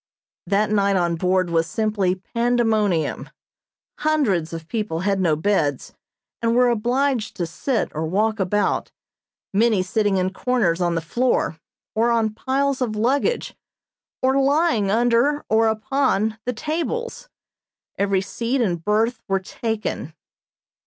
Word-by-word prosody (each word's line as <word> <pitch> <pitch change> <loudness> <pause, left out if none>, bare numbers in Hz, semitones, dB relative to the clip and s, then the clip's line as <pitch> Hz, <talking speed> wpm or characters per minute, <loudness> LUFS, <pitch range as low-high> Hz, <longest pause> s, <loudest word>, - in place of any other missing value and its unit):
That 210 +1 +1
night 200 -1 +2
on 175 -2 +1
board 185 +1 +1
was 165 -1 +2
simply 205 -3 0
pandemonium. 220 -4 0 0.7
Hundreds 230 - +1
of 165 -1 -7
people 210 -6 -2
had 195 0 0
no 170 -5 +2
beds, 155 -5 0 0.5
and 230 0 +1
were 250 0 +5
obliged 240 +1 0
to 175 - -2
sit 220 +9 -2
or 160 +1 -2
walk 215 +5 0
about, 200 +2 0 0.6
many 215 -2 +3
sitting 205 +1 +1
in 185 +1 0
corners 195 -7 0
on 175 -1 +1
the 165 - 0
floor, 200 -3 0 0.3
or 230 +2 +2
on 225 -2 +1
piles 270 +4 -1
of 225 -4 -1
luggage 275 - 0 0.7
or 265 +1 +3
lying 280 - +2
under 240 +7 +2
or 225 +1 +4
upon 220 -1 0
the 250 - -1
tables. 340 - -3 0.7
Every 195 -1 +1
seat 235 +6 -2
and 175 -8 0
berth 220 +4 +1
were 195 -1 +1
taken. 210 -5 -4
215 Hz, 130 wpm, -22 LUFS, 185-245 Hz, 0.7 s, were